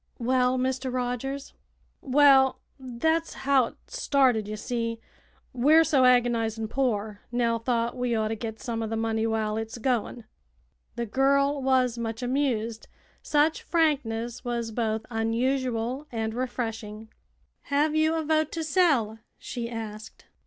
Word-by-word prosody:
"Well, 250 +1 +2
Mr. 260 0 -1
Rogers?" 255 +2 -3 0.5
"Well, 270 -1 +5 0.2
thet's 320 +7 -1
how 270 -3 +4
it - - -9
started, 265 - +1
ye 215 - -4
see. 230 +1 -3 0.5
We're 300 +6 +5
so 275 -5 +3
agonizin' 230 -3 +2
poor, 215 -6 -1
Nell 235 -1 +1
thought 235 0 -1
we 245 -2 -1
orter 220 0 0
git 220 0 -6
some 230 -2 -4
o' 225 - -2
the 225 - -3
money 225 0 0
while 220 -1 -1
it's 225 +1 -5
goin'." 240 -1 -1 0.7
The 235 0 -2
girl 275 +4 +2
was 255 -2 +2
much 225 +1 -4
amused. 245 -4 -1 0.3
Such 300 +2 +2
frankness 245 -8 0
was 235 -2 -3
both 220 -1 -2
unusual 245 +3 -1
and 220 -2 -2
refreshing. 225 -3 -4 0.6
"Have 295 +2 +1
you 315 +1 +2
a 320 - -1
vote 310 0 +1
to 330 - -2
sell?" 285 - +2 0.2
she 235 -1 -5
asked. 220 -2 -8
245 Hz, 135 wpm, -26 LUFS, 225-270 Hz, 0.7 s, Well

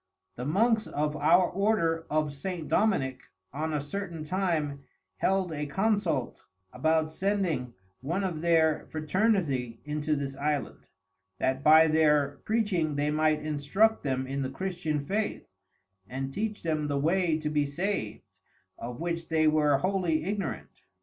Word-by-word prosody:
The 125 - -5
Monks 220 - +2
of 150 +1 -1
our 165 +5 +4
Order 175 -5 +1
of 155 -1 0
St. 165 +2 -5
Dominic 135 -12 +1 0.3
on 155 +3 -2
a 150 - 0
certain 165 +2 -5
time 155 -5 -1 0.3
held 190 -2 +1
a 150 -1 -3
Consult 190 - -1 0.3
about 155 +4 +1
sending 170 - -1 0.2
one 170 +9 -2
of 170 -5 -2
their 160 -2 +2
Fraternity 155 - 0
into 150 +1 -1
this 140 -1 -4
Island, 145 -3 -3 0.5
that 130 +5 -1
by 155 +2 +8
their 150 -3 +3
Preaching 195 -9 0
they 145 +1 0
might 155 0 +2
instruct 155 +9 +1
them 130 -1 -1
in 135 +1 -3
the 130 - -2
Christian 160 -2 -3
Faith, 205 +5 -2 0.6
and 135 +1 -4
teach 215 +3 -3
them 155 -2 -1
the 145 -1 -1
way 165 +2 +2
to 155 -1 -3
be 145 -1 +1
sav'd, 170 - -3 0.6
of 120 +1 -6
which 170 -1 -3
they 160 -1 +3
were 150 -2 +4
wholly 180 -2 0
Ignorant. 195 -2 -4
155 Hz, 145 wpm, -28 LUFS, 145-185 Hz, 0.6 s, by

